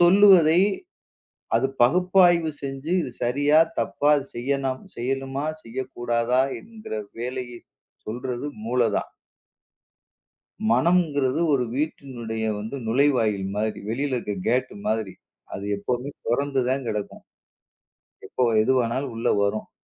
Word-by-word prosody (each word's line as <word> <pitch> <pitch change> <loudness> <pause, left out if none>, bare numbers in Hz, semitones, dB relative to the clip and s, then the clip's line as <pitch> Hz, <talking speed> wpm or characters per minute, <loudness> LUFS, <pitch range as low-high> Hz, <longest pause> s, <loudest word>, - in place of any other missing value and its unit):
சொல்லுவதை 180 -2 +7 1.0
அது 135 - +2
பகுப்பாய்வு 175 +3 +4
செஞ்சு 135 +4 -5
இது 130 - -5
சரியா, 145 +5 +3 0.2
தப்பா, 145 +1 +1 0.2
செய்யனாம் 130 +3 -2
செய்யலாமா, 135 +3 -2 0.2
செய்யக்கூடாதா 120 0 -1 0.2
என்கிற 220 - -10 0.3
வேலையை 125 0 -4 0.5
சொல்றது 125 +4 -4 0.2
மூளைதான். 120 -3 0 1.6
மனங்குறது 145 0 +2
ஒரு 125 -3 +2
வீட்டினுடைய 120 -7 -3
வந்து 110 +6 -5
நுழைவாயில் 110 -6 +2
மாரி. 110 0 -2
வெளியில 130 +4 -1
இருக்க 105 -3 -4
கேட் 125 +2 +1 0.2
மாதிரி. 110 -3 -1 0.4
அது 100 - -5
எப்பவுமே 125 +6 -3 0.2
தொறந்துதான் 135 0 0
கிடக்கும். 105 -1 -5 1.0
எப்போ 125 - -1 0.2
எதுவானாலும் 130 +1 0
உள்ள 115 - 0
வரும். 100 +2 -1
130 Hz, 95 wpm, -24 LUFS, 120-145 Hz, 1.6 s, சொல்லுவதை